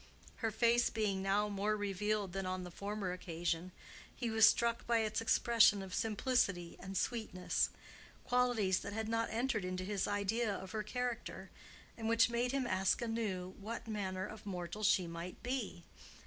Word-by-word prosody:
Her 225 - 0
face 235 +2 +3
being 210 -3 0
now 200 +2 +2
more 205 +1 0
revealed 205 -1 -1
than 195 -1 -2
on 185 0 -2
the 180 - -7
former 200 0 -3
occasion, 175 0 -2 0.4
he 240 -3 -2
was 220 0 +7
struck 235 0 0
by 235 -1 +3
its 215 0 -1
expression 225 -3 +5
of 190 -1 -8
simplicity 210 -6 +1
and 190 +1 -5
sweetness,—qualities 225 +1 0
that 200 - -6
had 220 0 -2
not 230 0 0
entered 230 -2 0
into 185 0 -3
his 200 -1 -1
idea 205 +3 0
of 190 0 -7
her 215 -1 -2
character, 245 +2 -4 0.4
and 225 -1 -3
which 230 0 +4
made 240 +1 +1
him 270 -1 0
ask 190 -4 +2
anew 205 -6 -2
what 225 +3 -6
manner 190 -3 -2
of 215 0 -9
mortal 185 +1 -5
she 195 -3 +4
might 170 +2 -7
be. 240 -9 -3
210 Hz, 160 wpm, -35 LUFS, 185-230 Hz, 0.4 s, was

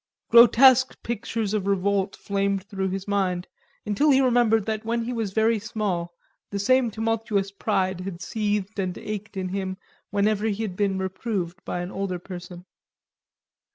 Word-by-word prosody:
Grotesque 250 +2 +7
pictures 225 -2 -2
of 200 -2 -1
revolt 200 0 +1
flamed 200 -1 -1
through 195 -1 -3
his 195 +1 -4
mind, 190 -3 0 0.4
until 210 +9 +2
he 270 -2 +6
remembered 240 -5 +3
that 220 0 -2
when 230 +1 -1
he 245 +2 -3
was 225 -4 -2
very 220 +2 +2
small, 200 -6 -2 0.4
the 200 - -3
same 250 +4 +3
tumultuous 220 -2 -1
pride 190 -3 -1
had 185 -2 -6
seethed 210 -1 -2
and 185 -2 -2
ached 210 -1 -6
in 185 -1 -2
him 190 0 -3 0.3
whenever 210 +1 +1
he 215 +1 -1
had 195 -5 -4
been 195 -1 0
reproved 190 -1 -3
by 175 - -3
an 175 +1 -5
older 195 -2 -3
person. 175 0 -9
200 Hz, 155 wpm, -25 LUFS, 190-225 Hz, 0.4 s, Grotesque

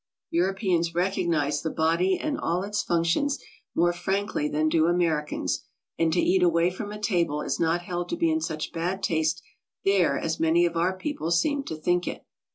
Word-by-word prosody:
Europeans 175 -1 +1
recognize 170 -5 0
the 160 - -2
body 170 +4 +2
and 305 -2 -2
all 175 +3 0
its 210 +1 -1
functions 170 +12 +1 0.4
more 175 +1 +3
frankly 190 -3 -1
than 155 +1 +1
do 160 0 +3
Ameri 165 -3 +1
cans, - - -2 0.4
and 165 -1 +3
to 175 - +1
eat 185 +1 +3
away 170 0 +3
from 205 +3 -6
a 210 - -7
table 170 -8 0
is - - -2
not 170 +1 +1
held 175 0 -4
to 340 - -2
be 330 -1 +2
in 320 0 0
such 155 - -4
bad 180 +4 -2
taste 160 -1 0 0.4
there 185 -8 +3
as 160 +2 -2
many 165 +2 +4
of 170 -1 -1
our 180 +3 +1
people 185 - -3
seem 280 - +2
to 160 - -4
think 175 +3 0
it. - - -5
175 Hz, 190 wpm, -26 LUFS, 165-190 Hz, 0.4 s, many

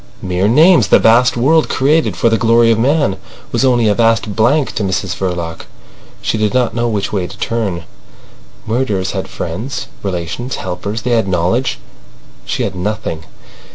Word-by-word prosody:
Mere 90 +1 0
names. 150 - +5
The - - +6
vast 120 +2 +4
world 155 +6 +3
created 150 +4 +1
for - - +2
the 115 0 +3
glory 115 +1 +4
of 110 - +1
man 140 -5 +1 0.3
was 120 - 0
only 120 -4 +3
a 105 - +3
vast 115 -2 +1
blank 130 +6 +2
to 110 - -2
Mrs 95 -1 -2
Verloc. 85 -3 -4 0.6
She 110 - -1
did 105 +2 0
not 125 -3 +1
know 120 +1 -1
which 105 -3 -2
way 95 -3 -1
to 100 - -12
turn. 105 -7 -2 0.8
Murderers 110 -5 -1
had - - -4
friends, 115 +11 -5
relations, 95 +7 -4
helpers—they 100 +6 -4
had 115 -4 +2
knowledge. 95 - 0 0.7
She - - -2
had 100 - -2
nothing. 95 -4 -4
110 Hz, 160 wpm, -15 LUFS, 95-120 Hz, 0.8 s, The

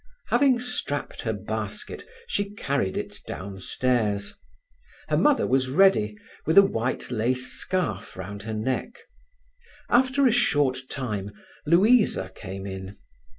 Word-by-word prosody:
Having 260 -4 +4
strapped 250 0 -3
her - - -1
basket, - - -5 0.2
she 205 - -2
carried 135 - -1
it - - -5
downstairs. 100 +2 -1 0.8
Her - - +2
mother 295 -2 +4
was 130 0 +1
ready, 130 - +4 0.3
with 160 - +2
a 200 - +11
white 125 - -2
lace 125 +3 0
scarf 135 - -2
round 100 +2 -6
her 110 +2 -5
neck. 125 - -2 0.9
After 260 +3 +4
a 250 - +5
short 140 - +2
time 105 -7 -3 0.4
Louisa 210 +8 +4
came 95 0 -7
in. 95 +1 -7
130 Hz, 120 wpm, -26 LUFS, -, 0.9 s, a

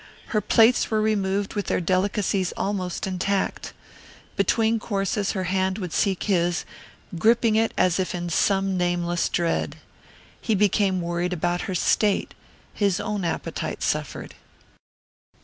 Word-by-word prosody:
Her 215 - +1
plates 225 +4 +4
were 220 - +1
removed 200 -2 0
with 205 -2 -3
their - - +1
delicacies 185 +1 0
almost 190 -3 -2
intact. 190 +1 -2 0.6
Between 225 0 +2
courses 200 -1 -1
her 190 -3 -2
hand 190 +1 0
would 180 -6 -5
seek 195 -3 +1
his, 175 -3 +1 0.5
gripping 230 +1 +3
it 225 +1 +2
as 185 0 +2
if 185 -1 -1
in 175 0 -4
some 195 +2 +1
nameless 175 -1 0
dread. 170 -1 -1 0.7
He 225 - +1
became 195 -2 +2
worried 175 +1 -2
about 175 +3 -1
her 185 - -2
state; 205 +3 +1 0.4
his 200 -3 +1
own 205 -2 -3
appetite 170 - -3
suffered. - - -2
190 Hz, 130 wpm, -24 LUFS, 180-210 Hz, 0.7 s, plates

